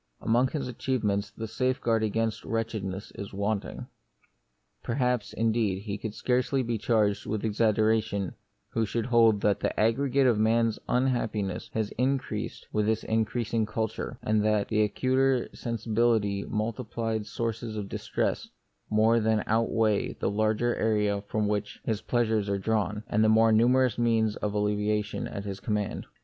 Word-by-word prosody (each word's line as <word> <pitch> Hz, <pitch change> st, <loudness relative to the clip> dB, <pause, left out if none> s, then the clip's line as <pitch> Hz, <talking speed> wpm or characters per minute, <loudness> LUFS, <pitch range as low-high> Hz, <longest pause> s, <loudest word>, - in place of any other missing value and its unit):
Among 120 Hz, +3 st, +2 dB
his 135 Hz, -1 st, -3 dB
achievements 110 Hz, -5 st, -1 dB
the 110 Hz, +2 st, -6 dB
safeguard 120 Hz, -1 st, 0 dB
against 110 Hz, +1 st, -1 dB
wretchedness 110 Hz, -4 st, -3 dB
is 100 Hz, 0 st, -8 dB
wanting. 100 Hz, +1 st, -2 dB, 1.0 s
Perhaps, 125 Hz, -2 st, 0 dB
indeed, 110 Hz, -4 st, 0 dB
he 100 Hz, -1 st, -4 dB
could 110 Hz, 0 st, -5 dB
scarcely 130 Hz, +1 st, +1 dB
be 115 Hz, -2 st, -2 dB
charged 105 Hz, -3 st, +1 dB
with 110 Hz, 0 st, -2 dB
exaggeration 110 Hz, -2 st, +1 dB, 0.4 s
who 115 Hz, -, 0 dB
should 110 Hz, +1 st, -2 dB
hold 115 Hz, -4 st, +4 dB
that 105 Hz, -1 st, +2 dB
the -, -, -2 dB
aggregate 135 Hz, +5 st, +2 dB
of 120 Hz, -4 st, +3 dB
man's 115 Hz, 0 st, +2 dB
unhappiness 110 Hz, -7 st, 0 dB
had 110 Hz, -2 st, -1 dB
increased 125 Hz, -4 st, -1 dB
with 105 Hz, -1 st, +1 dB
his 110 Hz, 0 st, +1 dB
increasing 110 Hz, 0 st, 0 dB
culture, 110 Hz, +3 st, -3 dB
and 105 Hz, -1 st, +2 dB
that 105 Hz, -1 st, +1 dB
the 110 Hz, -1 st, +2 dB
acuter 130 Hz, +4 st, +2 dB
sensibility 110 Hz, -3 st, 0 dB
and -, -, -8 dB
multiplied 110 Hz, 0 st, -2 dB
sources 115 Hz, 0 st, -3 dB
of 105 Hz, -2 st, -4 dB
distress -, -, -2 dB, 0.4 s
more 110 Hz, +2 st, +4 dB
than 110 Hz, -1 st, +1 dB
out 115 Hz, +1 st, +1 dB
weigh 110 Hz, -2 st, +1 dB
the -, -, -2 dB
larger 110 Hz, +3 st, +1 dB
area 105 Hz, -2 st, +1 dB
from 105 Hz, -1 st, 0 dB
which 105 Hz, 0 st, -2 dB
his 110 Hz, -2 st, -1 dB
plea 120 Hz, -1 st, +1 dB
sures 110 Hz, -2 st, 0 dB
are 100 Hz, -, +1 dB
drawn, 105 Hz, +1 st, -1 dB
and 110 Hz, -, +2 dB
the 110 Hz, -, +4 dB
more 110 Hz, +1 st, +5 dB
numerous 125 Hz, +2 st, +3 dB
means 110 Hz, -2 st, +2 dB
of 105 Hz, 0 st, -3 dB
alleviation 105 Hz, 0 st, 0 dB
at 100 Hz, -, -6 dB
his 100 Hz, -1 st, -5 dB
command. 105 Hz, -2 st, -2 dB
110 Hz, 155 wpm, -28 LUFS, 105-115 Hz, 1.0 s, more